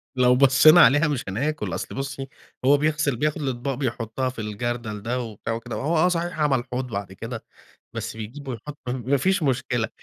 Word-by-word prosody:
لو 125 -1 +5
بصينا 140 +5 +7
عليها 145 +4 +6
مش 145 -4 -1
هناكل 140 +10 -2
أصل - - -5
بُصي، 135 0 -4 0.4
هو 140 +2 +6
بيغسل 150 -2 +1
بياخد 150 +5 -1
الأطباق 135 0 -2
بيحطها 120 -1 -2
في 130 - -9
الجردل 110 0 -4
ده 120 +4 -2
وبتاع 115 -1 -5
وكده، 115 +1 -5
وهو 160 +5 0
آه 160 +3 +5
صحيح 170 -2 -2
عمل 140 -5 +2
حوض 130 +1 -2
بعد 100 -4 -5
كده، 115 +3 -7 0.5
بس 115 -1 -5
بيجيبه 130 +6 -7
ويحط 145 +5 -8
ما 130 +2 0
فيش 190 +5 +1
مشكلة 125 -4 0
130 Hz, 180 wpm, -24 LUFS, 115-145 Hz, 0.5 s, بصينا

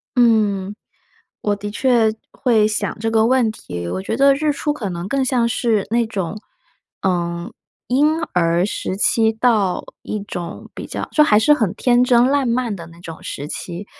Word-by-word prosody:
嗯， 210 -5 +2 0.7
我 205 - 0
的 205 +1 -6
确 230 -1 +2 0.2
会 225 -4 +2
想 215 0 -2
这 225 +1 -1
个 225 0 +3
问 250 -2 +3
题， 85 - -7
我 190 - -3
觉 225 - -2
得 275 +2 +5
日 300 +2 0
出 295 +1 -1
可 245 -9 -4
能 175 0 -5
更 270 +3 0
像 250 -3 +1
是 225 -3 0
那 235 +1 +2
种， 200 -2 -4 0.6
呃， 170 -2 -1 0.4
婴 300 +5 +2
儿 170 0 +2
时 190 -2 -3
期 220 +2 +3
到 220 -5 +1 0.2
一 215 - -4
种 175 -4 -7
比 - - -7
较 - - -5
就 305 - +5
还 210 -8 +5
是 225 +7 +4
很 220 -10 0
天 245 -1 +3
真 245 -1 +4
烂 275 -2 +1
漫 235 -2 0
的 170 -4 -9
那 170 0 -15
种 165 -2 -9
时 140 - -6
期。 175 +5 -6
220 Hz, 195 characters per minute, -20 LUFS, 190-245 Hz, 0.7 s, 得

